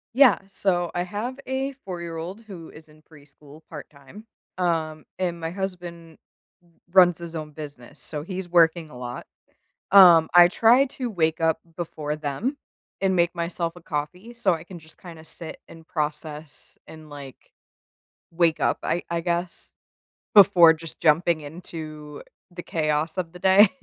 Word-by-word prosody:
Yeah. 260 -6 +6
So, 180 -3 -1
I 175 - -1
have 225 +8 -5
a 265 +1 -2
four-year-old 170 +2 -6
who 185 -7 -11
is 155 +1 -15
in 155 0 -21
preschool 150 0 -17
part 150 -3 -9
time, 145 +10 -15 0.3
um, 160 -3 -1
and 175 -2 -2
my 165 0 -4
husband 175 -3 -7 0.4
r 175 - -29 0.2
runs 180 -3 +6
his 170 -1 -8
own 155 -1 -6
business, 145 -5 -11
so 150 -2 -3
he's 185 0 -6
working 165 -1 +3
a 125 - -11
lot. 125 0 -7 0.7
Um, 175 -5 +8
I 175 0 +9
try 235 +7 +4
to 255 -1 -5
wake 160 -4 0
up 160 0 +1 0.2
before 155 -3 -4
them 155 - -3 0.4
and 190 -1 +1
make 170 0 +2
myself 170 0 -3
a 175 - -13
coffee 180 +9 -5
so 205 -5 +1
I 160 -1 -3
can 175 -1 -11
just 160 0 -12
kinda 165 -3 -12
sit 160 0 -5
and 165 -1 -14
process 150 -1 -5
and, 155 -1 -13
like, 140 -3 -12 0.8
wake 165 -1 +1
up, - - +1
I 175 - -1
I 170 0 -1
guess, 175 0 -3 0.6
before 185 -5 +8
just 165 0 -8
jumping 160 +1 +2
into 155 -1 -9 0.3
the 175 0 -9
chaos 155 0 -1
of 170 -3 -3
the 180 - -12
day. 190 +2 +6
170 Hz, 160 wpm, -24 LUFS, 155-180 Hz, 0.8 s, I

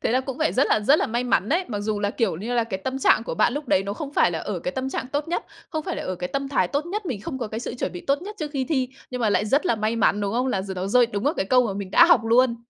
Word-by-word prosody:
Thế - - +1
là 255 - +3
cũng 265 0 -6
phải 315 0 +1
rất 265 - +3
là, - - +2
rất 275 +9 +4
là - - +1
may 240 +1 -1
mắn 210 -5 +1
đấy. 345 +5 +1
Mặc 205 -3 -3
dù 210 0 -2
là, 205 0 0
kiểu 220 -9 0
như 225 +8 -4
là, 235 -2 +2
cái 190 -4 -4
tâm 260 +7 -3
trạng 245 - +4
của - - -4
bạn 240 - +3
lúc 290 +1 -5
đấy 185 - +3
nó 200 +1 -4
không 285 +4 -6
phải 175 - +3
là 165 - -3
ở 190 +1 -4
cái 180 - -4
tâm 260 +3 -3
trạng 260 - -3
tốt 290 +2 -1
nhất, 345 - -2 0.3
không 315 -2 -2
phải - - -3
là - - -4
ở 185 - -3
cái 180 0 -4
tâm 275 0 -3
thái 280 - +1
tốt 290 +3 -2
nhất, 400 +2 -4
mình 235 -9 -3
không 265 +2 -5
có 235 - -3
cái 220 +2 -5
sự 240 - -5
chuẩn 250 - -3
bị 175 - -7
tốt 280 +3 +1
nhất 420 +3 -8
trước 305 -2 -4
khi 275 -3 -1
thi, 260 -3 0 0.2
nhưng 250 -1 -4
mà 220 - +2
lại 205 - +2
rất 280 - +2
là 340 - +3
may 215 +2 -1
mắn, 210 -2 +2
đúng 200 -1 -1
không? 250 +3 0
Là 195 -7 0
giờ 190 -1 -6
nó 185 +1 -3
rơi 240 +4 +4
đúng 205 0 -4
vào 295 - +2
cái - - -1
câu 250 +3 +4
mà 200 - -2
mình 200 -2 -5
đã 340 - +7
học 340 -9 +6
luôn. 235 +1 +3
245 Hz, 365 wpm, -24 LUFS, 205-275 Hz, 0.3 s, đã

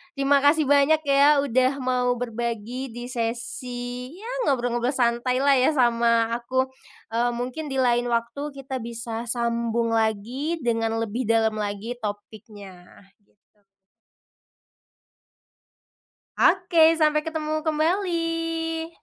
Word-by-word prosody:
Terima 275 0 +2
kasih 295 0 +4
banyak 285 +2 +4
ya 280 +1 +5
udah 255 0 +2
mau 250 -1 +1
berbagi 235 +1 -4
di 240 +1 -7
sesi, 245 +1 -4
ya 460 +3 -7 0.2
ngobrol-ngobrol 245 -1 0
santailah 255 +2 +2
ya 260 +4 +3
sama 235 -3 +3
aku, 260 +2 -1 0.4
eee, 240 +1 +1
mungkin 255 +5 -5
di 265 - -1
lain 240 -1 +2
waktu 260 +6 -2
kita 265 -3 -6
bisa 230 0 -5
sambung 235 -1 0
lagi 235 +9 -1
dengan 225 -2 -1
lebih 230 +4 -3
dalam 225 -1 +2
lagi 205 +4 -4
topiknya, 205 -3 -8 0.4
gitu. 205 +1 -40 2.8
Oke, 335 -3 +4
sampai 305 0 +3
ketemu 310 -1 -3
kembali. 330 0 -1
250 Hz, 105 wpm, -24 LUFS, 230-290 Hz, 2.8 s, ya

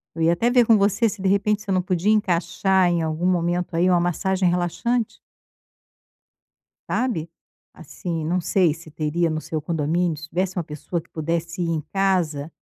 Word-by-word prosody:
eu 165 - -1
ia 165 - +4
até 230 +8 +1
ver 245 -1 +4
com 225 - +6
você 200 +3 +2
se 200 -2 -5
de 190 - +1
repente, 205 +1 +1
você 205 -2 -5
não 185 -1 +2
podia 180 +3 +1
encaixar 190 -1 +2
em 170 -1 +1
algum 160 +2 -2
momento 175 -1 0
aí 175 +2 +3
uma 175 - +4
massagem 185 +2 +1
relaxante. 180 +7 -1 1.7
Sabe, 175 -11 -1 0.4
assim, 165 -5 -5
não 180 +3 0
sei 175 -3 +2
se 160 -1 -13
teria 160 +3 0
no 155 - -2
seu 155 0 -4
condomínio, 165 +1 0
se 160 - -9
tivesse 185 +3 -2
uma 175 - 0
pessoa 155 +3 -5
que - - -27
pudesse 165 +2 -3
ir 170 - 0
em 160 -2 -1
casa, 170 -6 0
175 Hz, 180 wpm, -23 LUFS, 165-190 Hz, 1.7 s, com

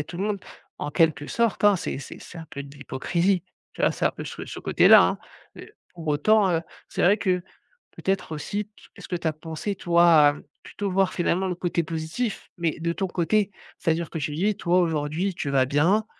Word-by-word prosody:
a 145 - -3
tout 175 - -9
le 195 - -2
monde» 205 -2 -1 0.4
en 150 - -3
quelque 150 -2 +2
sorte, 230 -3 0
hein, 205 -2 +6
c'est 150 - -4
c'est 140 - -9
c'est 170 - -11
un 160 - -8
peu 140 - -6
de 140 +1 -12
l'hypocrisie, 170 +7 0 0.3
tu - - -11
vois? - - +4
C'est - - -3
un - - +2
peu - - -8
ce - - -7
ce - - -8
côté-là, - - +7
hein. - - +1 0.4
Heu, 430 - -11 0.2
pour 165 -2 -7
autant, 195 +7 +3
heu, 165 -2 +1 0.3
c'est - - -2
vrai 200 +4 +5
que 185 -4 0 0.5
peut-être 190 -4 -2
aussi, 200 +7 -3
t 210 - -34 0.2
est-ce - - -11
que 180 - -2
tu 170 - -6
as 155 - 0
pensé, 160 +6 -5
toi, 170 -1 +3 0.2
à, - - +7
hem, 145 - -11 0.2
plutôt 200 -2 -4
voir 190 0 +2
finalement 185 +1 0
le 180 - -2
côté 175 -1 -1
positif, 165 +9 -4
mais 170 -2 -1
de 170 +1 -1
ton 190 - -2
côté? 195 +4 +1 0.3
C'est-à-dire 165 0 0
que - - -5
tu 150 0 -3
dis: 200 +5 +1
«Toi 180 -1 +2
aujourd'hui, 165 +3 0
tu 145 -4 -4
vas 135 -2 +3
bien, 170 - +2
170 Hz, 225 wpm, -25 LUFS, 155-195 Hz, 0.5 s, côté-là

